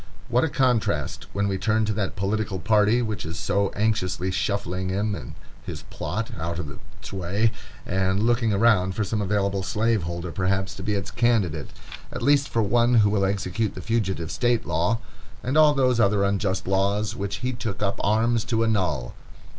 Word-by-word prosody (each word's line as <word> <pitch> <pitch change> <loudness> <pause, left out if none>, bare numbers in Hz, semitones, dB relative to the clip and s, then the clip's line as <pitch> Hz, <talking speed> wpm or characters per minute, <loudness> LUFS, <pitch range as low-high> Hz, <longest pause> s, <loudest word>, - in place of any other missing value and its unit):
What 125 +1 +3
a 160 - +1
contrast, 130 -5 0
when 100 0 0
we 95 -1 -1
turn 110 +1 +2
to 105 - 0
that 105 -2 -2
political 100 +1 -1
party 105 +5 +3
which 110 -2 -3
is 80 0 -5
so 100 +4 0
anxiously 100 -3 0
shuffling 95 -1 -1
him 105 +3 0
and 65 -11 -7 0.3
his - - -7
plot 110 +1 -3
out 85 +1 -3
of 75 -5 -5 0.3
its - - -10
way, 100 +4 +1 0.3
and 95 +1 0
looking 115 -1 +2
around 100 -3 +3
for 110 - 0
some 105 +1 -1
available 100 -1 0
slaveholder, 90 -5 -1
perhaps, 95 +1 -1
to - - -9
be 105 +2 -1
its 100 -3 -3
candidate, 105 -11 +1 0.4
at - - -5
least 140 +1 +3
for 115 - +1
one 120 +3 +3
who 105 -3 +5
will 100 -2 +2
execute 100 +2 -1
the - - -6
Fugitive 95 -8 -1
Slave 120 -1 +1
Law, 85 +6 +1 0.5
and 130 +3 -1
all 155 -1 +6
those 130 -3 +2
other 100 -2 +3
unjust 100 -1 0
laws 100 +3 +1
which 100 -3 -3
he 130 - 0
took 110 -3 -4
up 100 - -1
arms 110 +2 +2
to 115 -2 +1
annul! 90 - 0
100 Hz, 180 wpm, -25 LUFS, 95-115 Hz, 0.5 s, all